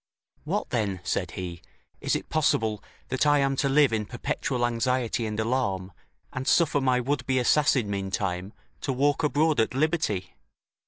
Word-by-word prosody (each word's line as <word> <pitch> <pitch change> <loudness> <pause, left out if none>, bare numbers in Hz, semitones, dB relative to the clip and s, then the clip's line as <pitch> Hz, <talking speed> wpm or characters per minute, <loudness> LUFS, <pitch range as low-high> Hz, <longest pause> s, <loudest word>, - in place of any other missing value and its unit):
"What - - -2
then," 100 -5 -1
said 85 - -2
he, 85 -2 -5 0.4
"is - - 0
it - - -4
possible 110 -9 +1 0.3
that 130 +3 +1
I 145 0 +5
am 135 -1 +2
to 140 - +1
live 140 -3 +4
in 105 -2 -1
perpetual 120 0 -2
anxiety 120 0 0
and 105 0 -4
alarm, 110 -6 -1 0.4
and 130 0 -4
suffer 150 -4 +3
my 130 -1 +2
would 140 +4 -1
be 130 -1 +2
assassin, 130 -2 +3
meantime, 95 -1 -2 0.3
to 140 - -1
walk 145 +4 +2
abroad 150 +1 +2
at 110 +3 +1
liberty? 145 - 0
125 Hz, 160 wpm, -26 LUFS, 105-140 Hz, 0.4 s, I